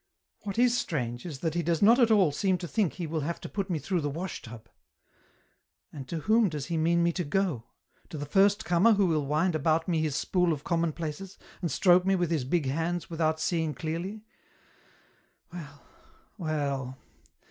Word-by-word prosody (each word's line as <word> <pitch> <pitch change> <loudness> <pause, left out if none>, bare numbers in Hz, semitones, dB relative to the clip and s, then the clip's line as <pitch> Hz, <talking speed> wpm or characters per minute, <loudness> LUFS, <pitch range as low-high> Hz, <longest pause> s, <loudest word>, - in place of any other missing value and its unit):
What 200 -1 -6
is 245 0 +4
strange 125 - -3
is 145 -6 -7
that 165 -3 -1
he 175 - 0
does 170 -1 0
not 230 +5 +6
at 235 -2 +5
all 200 -8 +4
seem 185 +5 +1
to 175 - -6
think 185 +3 0
he 175 - -5
will 160 0 -2
have 160 +3 -3
to - - -6
put 200 -1 -4
me 170 - 0
through 175 +4 -1
the 145 - -1
wash 165 +5 -5
tub; 115 -1 -11 1.3
and 135 -4 -8
to 165 +1 -4
whom 220 +3 +3
does 150 -4 -4
he 170 - -3
mean 170 +2 +2
me 170 - +3
to 180 +1 -3
go 160 - -1 0.2
— - - -36
to 155 - -7
the 145 - -4
first 200 +7 +3
comer 185 +6 +4
who 200 -1 +3
will 155 -5 0
wind 160 +5 +1
about 160 +1 +1
me 165 -3 +1
his 155 -3 -1
spool 180 +2 +1
of 145 -2 -6
commonplaces, 170 +2 -3 0.2
and 170 - -1
stroke 180 0 +4
me 195 +1 +2
with 175 -3 0
his 150 -6 0
big 155 +2 0
hands 165 +5 -2
without 160 -1 0
seeing 160 -2 -1
clearly? 175 +9 -4 0.6
" - - -34
Well, 145 -5 -10 0.5
well. 140 - -3
165 Hz, 200 wpm, -28 LUFS, 150-185 Hz, 1.3 s, not